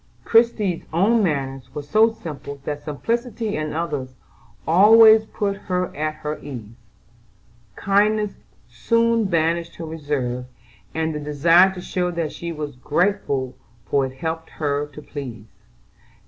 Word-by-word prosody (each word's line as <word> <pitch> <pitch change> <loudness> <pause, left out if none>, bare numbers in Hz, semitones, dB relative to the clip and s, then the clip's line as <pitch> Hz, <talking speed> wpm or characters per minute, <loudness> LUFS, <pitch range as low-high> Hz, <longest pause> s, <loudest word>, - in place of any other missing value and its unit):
Christie's 225 -6 +2
own 205 +8 +3
manners 135 -7 -2
were 150 - -4
so 215 +9 +4
simple 145 -8 -8
that 145 -1 -4
simplicity 230 - -2
in 155 0 -3
others 145 -6 -3 0.5
always 220 +5 +7
put 200 -1 -2
her 180 -2 -3
at 155 +1 -2
her 150 +1 -3
ease: 120 -7 -8 1.0
kindness 210 +1 +2 0.4
soon 230 - +1
banished 170 -1 0
her 165 - -7
reserve, 145 -6 -3 0.5
and 160 0 -1
the 150 - -3
desire 165 +6 +4
to 180 - -7
show 180 0 -1
that 170 -3 -2
she 170 0 -6
was 150 -4 -6
grateful 140 -4 0 0.3
for 135 +7 +1
it 130 - -10
helped 165 +1 -4
her 145 -1 -2
to 145 +1 -12
please. 125 -9 -7
160 Hz, 135 wpm, -22 LUFS, 145-200 Hz, 1.0 s, always